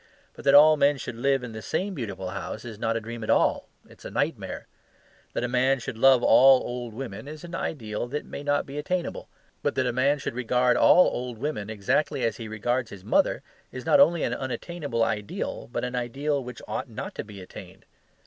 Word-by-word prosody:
But - - -13
that 140 - +6
all 155 +1 +8
men 140 0 +3
should 125 - -6
live 135 +2 +1
in 125 - -6
the 110 0 -7
same 190 - -2
beautiful 100 - -5
house 110 - -6
is 110 -3 -8
not 115 +1 0
a - - -1
dream 115 +1 -7
at - - -6
all; - - +2 0.2
it - - -18
is - - -16
a - - -5
nightmare. - - -2 0.7
That - - -2
a - - 0
man 130 +2 +2
should 115 - -6
love 130 +1 +5
all 135 0 +7
old 120 -2 -5
women 115 -2 -7
is 155 0 -9
an 175 0 -9
ideal 115 -9 -3
that 145 +4 -4
may - - -7
not 145 0 0
be 140 +2 -6
attainable. 180 +3 -3 0.3
But - - -1
that 130 - +1
a 125 - 0
man 140 +4 +2
should 135 - -4
regard 125 +1 +2
all 180 - +6
old 125 -2 -4
women 110 -5 -3
exactly 130 +6 0
as 115 -2 0
he 115 - -7
regards 120 +3 -1
his 95 -2 -11
mother - - +2 0.3
is 130 -1 -8
not 190 - +5
only 170 -3 +5
an - - 0
unattainable 130 -1 -3
ideal, 105 0 -3
but - - -3
an 125 0 -4
ideal 135 +4 -1
which 125 -1 -9
ought 130 - -4
not 110 - -6
to - - -5
be 105 -2 -11
attained. 90 - -12
125 Hz, 220 wpm, -26 LUFS, 115-140 Hz, 0.7 s, all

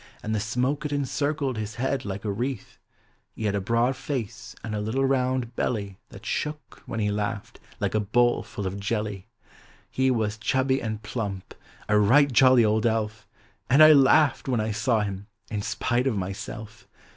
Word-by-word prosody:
Aud 110 - -2
the 110 - +1
smoke 125 +7 -1
it 150 - -3
encircled 145 -2 -1
his 110 +1 -5
head 130 +1 -1
like 100 +1 -5
a 105 - 0
wreath, 120 +3 -4 0.6
lie 110 - -3
had 100 - +1
a 100 - -1
broad 115 +6 +1
face 135 -5 -5
aud 110 - -4
a 105 - -2
little 120 +6 0
rouud 130 -2 0
belly 100 -4 -2
That 100 +3 -13
shook, 150 +4 -4
when 115 - -4
he 105 -1 +1
laughed, 105 0 -4 0.2
like - - -1
a 110 - +2
bowl 120 +4 +2
full 100 - -7
of 95 +2 -3
jelly. 105 -1 -3 0.6
He 130 0 +2
was 110 -3 0
chubby 130 +4 +1
aud 110 -1 -4
plump, 105 -3 -5 0.2
— - - -24
a 105 0 +4
right 140 +7 +5
jolly 130 -2 +6
old 110 +2 +2
elf; 110 -1 -2 0.4
And 140 +4 +7
I 155 0 +9
laughed, 140 +1 +4
when 125 -3 +1
1 110 0 -1
saw 110 +1 +1
him. 100 -1 -4 0.2
in 105 -2 -2
spite 120 +5 0
of 115 -6 0
myself. 105 +3 -6
115 Hz, 185 wpm, -26 LUFS, 105-130 Hz, 0.6 s, I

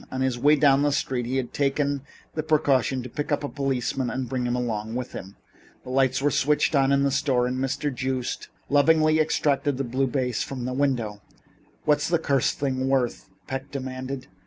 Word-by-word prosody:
On 130 - -3
his 130 -2 0
way 145 +4 +5
down 140 -1 +4
the 145 0 +2
street 125 -3 -1
he 130 +2 -1
had 130 -2 -3
taken 140 0 0 0.3
the 155 - -1
precaution 140 -5 +2
to - - -6
pick 145 +5 -4
up 145 - +1
a - - -1
policeman 135 -2 -1
and 130 -1 -3
bring 125 0 -2
him 120 - 0
along 110 -2 -2
with 125 -1 -4
him. 95 +1 -9 0.5
The 125 - -8
lights 135 0 +2
were 145 - +3
switched 150 +4 +2
on 135 -1 +3
in 140 0 +3
the 140 - +2
store 130 -3 +1
and 125 +1 -2
Mr. 135 +2 -1
Joost 130 -1 -3 0.2
lovingly 155 +2 +4
abstracted 145 -2 +1
the 135 - -1
blue 130 +2 0
vase 125 -2 -1
from 130 -3 -4
the 125 - -2
window. 120 -7 -1 0.6
"What's 150 -1 +3
the 170 - +3
cursed 140 -5 +1
thing 130 -1 -1
worth?" 125 -7 0 0.2
Peck 135 +1 -5
demanded. 130 -1 -5
135 Hz, 200 wpm, -25 LUFS, 125-145 Hz, 0.6 s, way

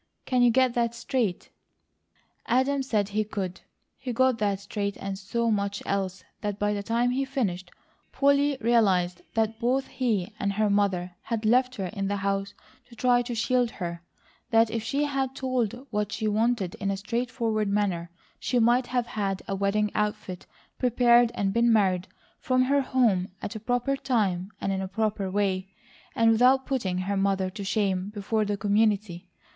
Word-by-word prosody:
Can 255 -1 +1
you 245 - +6
get 255 +1 +3
that 235 -1 0
straight?" 235 -5 -2 1.0
Adam 265 +3 +2
said 215 -6 0
he 215 +1 0
could. 190 -3 -5 0.4
He 260 -2 -4
got 255 0 +2
that 200 -2 0
straight 200 0 -3
and 195 0 -4
so 230 +4 -1
much 200 -1 -1
else 190 -1 -2 0.2
that 205 -1 -3
by 205 0 0
the 205 - -2
time 235 +3 +1
he 265 +2 0
finished, 200 -10 -2 0.4
Polly 280 0 +3
realized 195 -7 +2
that 225 0 0
both 255 +3 +1
he 225 -6 -1
and 200 0 0
her 210 0 +1
mother 185 -3 0
had 230 -2 -3
left 250 +3 +3
her 195 - -3
in 195 +1 -3
the 205 - -1
house 195 0 -2 0.3
to 235 - -14
try 245 +1 +3
to 240 0 -4
SHIELD 245 +1 +1
her; 170 -3 -4 0.5
that 225 -1 +4
if 225 0 -2
she 275 +6 -1
had 270 -2 -1
told 255 -2 -2
what 210 -1 -1
she 220 0 -2
wanted 215 -3 +1
in 195 - -1
a 195 - -1
straightforward 230 0 -1
manner 195 -4 0 0.3
she 250 - -1
might 240 +2 +3
have 245 -2 0
had 200 -4 -3
a - - -2
wedding 200 +2 0
outfit 210 -3 -3 0.3
prepared 240 -1 +4
and 195 -1 0
been 235 0 +3
married 190 -5 +2 0.3
from 255 0 +2
her 280 +2 +2
home 235 -9 +2
at 225 - -6
a - - -4
proper 245 +5 0
time 200 -9 0
and 195 - -1
in 190 0 -1
a 190 - -3
proper 210 -1 -1
way, 190 -1 -1 0.5
and 230 0 +4
without 255 +4 +4
putting 205 -10 -1
her 190 +2 -1
mother 195 -1 +1
to 200 - -6
shame 195 -2 0
before 210 +1 -1
the 205 0 -1
community. 200 -3 0
215 Hz, 175 wpm, -27 LUFS, 195-245 Hz, 1.0 s, you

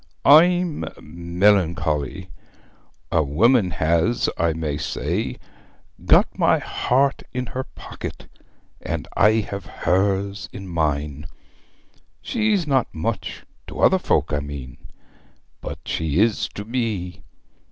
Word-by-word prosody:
I'm 175 +2 +5 0.2
melancholy! 85 -3 0 0.8
A 80 - +3
woman 95 - +3
has, 85 +8 +1
I 85 0 +1
may 80 -2 -3
say, 80 0 -2 0.7
got - - +4
my - - +4
heart 135 +2 0
in 125 0 -2
her 130 +2 -5
pocket, - - -9 0.6
and - - -4
I 105 +1 +5
have 100 -1 -6
hers 95 0 0
in 95 -1 -8
mine. 75 -3 -2 0.9
She's 215 -6 0
not 135 -4 +2
much 100 +7 -4 0.2
to - - -8
other - - +5
folk, - - 0
I 75 - +1
mean 70 -3 -7 0.8
but - - -6
she 80 0 -1
is 110 0 +2
to 100 - -6
me. 110 -7 -3
95 Hz, 110 wpm, -22 LUFS, 80-115 Hz, 0.9 s, I'm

